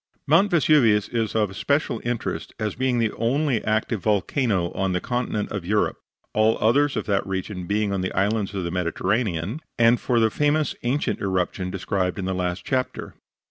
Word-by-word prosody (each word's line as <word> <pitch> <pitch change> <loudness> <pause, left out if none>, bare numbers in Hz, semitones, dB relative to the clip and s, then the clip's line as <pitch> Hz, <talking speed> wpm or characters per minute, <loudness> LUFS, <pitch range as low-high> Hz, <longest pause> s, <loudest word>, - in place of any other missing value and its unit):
Mount 165 +8 +4
Vesuvius 140 - +4
is 115 -3 -2
of 105 -3 +1
especial 140 +3 0
interest 120 -1 -3
as 105 -1 -2
being 130 -1 0
the 115 -2 +1
only 130 +1 0
active 110 0 0
volcano 105 -2 +1
on 95 -1 -1
the 90 - +1
continent 120 -2 -2
of 105 -4 -3
Europe 105 +4 0 0.4
all 110 +1 +3
others 140 +6 +3
of - - -2
that 100 -2 +1
region 95 -1 -4
being 105 0 0
on 95 - -1
the 95 - -2
islands 100 0 0
of 95 - -2
the 85 - -3
Mediterranean 95 - -1 0.2
and 115 +1 +5
for 120 -2 +1
the 110 -1 +3
famous 150 +2 +1
ancient 130 +5 -1
eruption 95 -1 -1
described 95 0 -2
in 95 - -3
the 95 - -1
last 90 0 -2
chapter. 130 -2 -2
110 Hz, 180 wpm, -24 LUFS, 95-125 Hz, 0.4 s, and